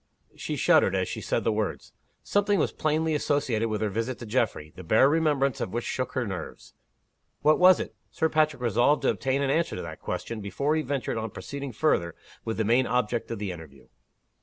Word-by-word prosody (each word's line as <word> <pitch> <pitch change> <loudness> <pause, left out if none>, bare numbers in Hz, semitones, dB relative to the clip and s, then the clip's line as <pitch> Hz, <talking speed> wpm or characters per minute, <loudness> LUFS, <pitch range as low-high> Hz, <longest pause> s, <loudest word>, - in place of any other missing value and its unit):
She - - -4
shuddered - - +4
as - - 0
she - - -5
said - - -1
the - - +2
words. - - -3 0.3
Something 205 0 +2
was - - +1
plainly 155 +1 0
associated 135 -7 0
with 105 -1 -2
her 110 - +1
visit 115 +5 -3
to 120 - -8
Geoffrey, 110 -9 -1
the 95 - -9
bare 110 +10 +5
remembrance 145 -4 +1
of - - -3
which 120 0 -2
shook 130 - -3
her 130 -3 -1
nerves. 95 -5 -7 0.7
What 155 +1 +4
was 185 0 +7
it? - - -5 0.2
Sir 160 - 0
Patrick 155 -4 +1
resolved 120 +6 +2
to - - +3
obtain 135 +1 -1
an 135 - +1
answer 165 +3 0
to 90 - -4
that 80 -1 -8
question, 115 -2 -4
before 140 +10 -1
he 160 - +1
ventured 140 -5 -2
on 110 0 -4
proceeding 140 +4 -6
further 105 - +1 0.3
with 115 - -3
the 110 - 0
main 120 +4 +3
object 120 -1 -1
of 115 - -3
the 100 -2 -3
interview. 80 -6 -12
125 Hz, 210 wpm, -27 LUFS, 110-150 Hz, 0.7 s, was